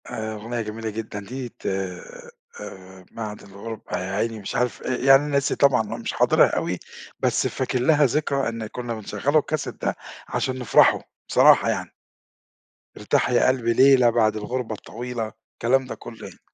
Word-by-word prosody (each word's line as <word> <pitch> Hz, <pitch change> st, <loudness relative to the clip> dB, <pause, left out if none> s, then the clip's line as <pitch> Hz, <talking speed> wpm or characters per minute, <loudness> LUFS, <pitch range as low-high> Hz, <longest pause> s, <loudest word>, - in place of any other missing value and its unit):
آآ، 110 Hz, 0 st, -4 dB
أغنية 115 Hz, +3 st, -4 dB
جميلة 110 Hz, +1 st, -5 dB
جدًا 110 Hz, -1 st, -5 dB
دي 125 Hz, +5 st, -6 dB
ت -, -, -22 dB
آآ، 95 Hz, -, -7 dB
بعد 110 Hz, -2 st, -6 dB
الغُربة 100 Hz, +3 st, -7 dB
يا 95 Hz, +1 st, -4 dB
عيني 110 Hz, +2 st, -2 dB
مش 100 Hz, -, -6 dB
عارف 125 Hz, -1 st, -1 dB
آآ، 130 Hz, -, -1 dB
يعني 135 Hz, +3 st, +5 dB
ناسي 140 Hz, -1 st, +1 dB
طبعًا 140 Hz, -5 st, +4 dB
أنا 110 Hz, -, -5 dB
مش -, -, -4 dB
حاضرها -, -, +4 dB
أوي، -, -, -2 dB, 0.4 s
بس -, -, +1 dB
فاكر 130 Hz, -, -2 dB
لها 145 Hz, +3 st, +4 dB
ذكرى 140 Hz, -1 st, 0 dB
إن 115 Hz, -1 st, -5 dB
كنّا 120 Hz, +1 st, -5 dB
بنشغّل 110 Hz, +6 st, -1 dB
الكاسيت 155 Hz, 0 st, -2 dB
ده -, -, -1 dB, 0.3 s
عشان 130 Hz, 0 st, -2 dB
نفرح، 125 Hz, -, +5 dB, 0.3 s
بصراحة -, -, +6 dB
يعني. -, -, -2 dB, 1.1 s
ارتاح -, -, +1 dB
يا 125 Hz, -, +3 dB
قلبي 125 Hz, -3 st, +2 dB
ليلة 130 Hz, -1 st, +6 dB
بعد 110 Hz, -2 st, +2 dB
الغُربة 110 Hz, +1 st, -3 dB
الطويلة، 115 Hz, 0 st, -6 dB, 0.2 s
الكلام 130 Hz, +3 st, +2 dB
ده 125 Hz, -, -6 dB
كُلّه -, -, -10 dB
يعني. -, -, -14 dB
115 Hz, 165 wpm, -23 LUFS, 110-130 Hz, 1.1 s, بصراحة